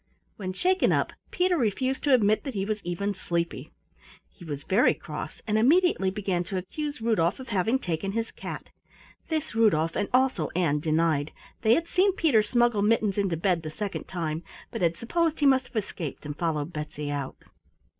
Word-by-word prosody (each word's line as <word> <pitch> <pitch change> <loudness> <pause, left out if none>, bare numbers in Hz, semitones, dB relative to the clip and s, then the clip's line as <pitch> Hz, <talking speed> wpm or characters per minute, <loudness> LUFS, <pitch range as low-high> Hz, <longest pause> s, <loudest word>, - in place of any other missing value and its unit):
When 185 -3 -4
shaken 370 - +2
up - - +1 0.2
Peter 360 0 +2
refused 260 - 0
to 285 - +4
admit 215 -2 +2
that, 270 -5 -5
he 195 -1 -1
was 215 0 -2
even 190 +4 -2
sleepy. 170 -3 -3 0.6
He 180 - -16
was 145 -4 -5
very 200 +6 +3
cross, - - -7
and 215 0 +1
immediately 300 - +4
began 190 -2 -1
to 190 +1 -3
accuse 290 - -4
Rudolf 210 -3 +2
of 260 -2 -9
having 220 +4 +2
taken 190 -3 -3
his 230 +1 -2
cat. - - -7 0.6
This 315 -5 -2
Rudolf 165 -8 +3
and 205 - -1
also 255 - +2
Ann 160 -5 +2
denied. 155 -1 +1 0.3
They 220 +2 +5
had 335 +1 -1
seen 380 +3 +3
Peter 300 - +4
smuggle 240 0 +2
Mittens 210 -1 +2
into 190 -5 0
bed 175 0 +1
the 155 - -5
second 200 +5 -4
time, 165 -3 -3 0.3
but - - -5
had 170 -1 +2
supposed 325 +6 0
he 290 - +2
must 265 -1 +4
have 240 - -23
escaped 185 -9 -4
and 145 0 -4
followed 160 0 -2
Betsy 150 -1 -4
out. 140 -2 -4
200 Hz, 185 wpm, -27 LUFS, 170-245 Hz, 0.6 s, They